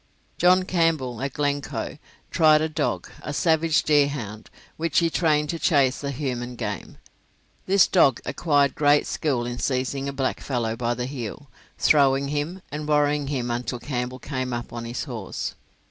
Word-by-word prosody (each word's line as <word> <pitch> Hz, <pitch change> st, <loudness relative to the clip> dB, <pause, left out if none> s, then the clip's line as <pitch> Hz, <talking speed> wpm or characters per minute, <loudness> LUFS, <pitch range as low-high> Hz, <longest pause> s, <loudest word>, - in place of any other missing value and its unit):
John 180 Hz, +1 st, +5 dB
Campbell, 160 Hz, -10 st, 0 dB
at 135 Hz, -1 st, -3 dB
Glencoe, 145 Hz, -2 st, -2 dB, 0.3 s
tried 155 Hz, -3 st, +5 dB
a 160 Hz, -, +1 dB
dog, 155 Hz, -, -2 dB
a -, -, -5 dB
savage 160 Hz, +1 st, +2 dB
deerhound, 140 Hz, -8 st, 0 dB, 0.3 s
which 165 Hz, 0 st, -1 dB
he 165 Hz, -1 st, +3 dB
trained 150 Hz, -3 st, +2 dB
to 165 Hz, -, -5 dB
chase 140 Hz, -5 st, +2 dB
the 140 Hz, -, -3 dB
human 125 Hz, -3 st, -3 dB
game. -, -, -5 dB, 0.7 s
This 195 Hz, 0 st, +6 dB
dog 140 Hz, -9 st, +4 dB
acquired 145 Hz, -4 st, +2 dB
great 145 Hz, 0 st, +3 dB
skill 135 Hz, -7 st, -1 dB
in 120 Hz, 0 st, -4 dB
seizing 135 Hz, 0 st, -1 dB
a -, -, -3 dB
blackfellow 125 Hz, -4 st, -2 dB
by 120 Hz, 0 st, -1 dB
the 125 Hz, -, -3 dB
heel, 130 Hz, 0 st, -7 dB, 0.3 s
throwing 140 Hz, -2 st, +3 dB
him, 150 Hz, +6 st, -3 dB
and 150 Hz, +1 st, -5 dB
worrying 150 Hz, -1 st, +2 dB
him 125 Hz, -4 st, -2 dB
until 125 Hz, +1 st, -2 dB
Campbell 125 Hz, -1 st, -4 dB
came 130 Hz, -2 st, -4 dB
up 120 Hz, 0 st, -5 dB
on 120 Hz, 0 st, -5 dB
his 120 Hz, +1 st, -4 dB
horse. 115 Hz, -8 st, -5 dB
140 Hz, 160 wpm, -24 LUFS, 125-150 Hz, 0.7 s, This